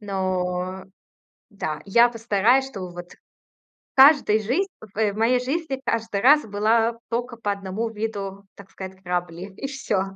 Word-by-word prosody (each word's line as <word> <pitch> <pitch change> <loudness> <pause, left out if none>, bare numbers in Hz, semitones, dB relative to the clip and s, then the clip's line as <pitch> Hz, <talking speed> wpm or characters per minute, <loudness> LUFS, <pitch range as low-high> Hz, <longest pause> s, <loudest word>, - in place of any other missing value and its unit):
Но. 185 -2 -2 0.7
Да, 155 -7 -4
я 235 +5 +5
постараюсь, 230 +3 +2
чтобы 190 -8 -7
вот 175 0 -9
в - - -22 0.8
каждый 270 -6 +6
жизн 260 - 0 0.3
в 210 -1 +1
в - - -11
моей 245 +3 +3
жизни 275 +1 -3
каждый 225 -3 -1
раз 295 +6 +6
была 225 +3 +1
только 240 +1 -3
по 210 -3 -2
1 200 +3 -3
виду, 200 -3 -5
так 200 -1 -15
сказать, 190 0 -9
грабли. 180 +1 -4
И 275 - -4
всё. 270 -8 -1
210 Hz, 150 wpm, -23 LUFS, 190-240 Hz, 0.8 s, каждый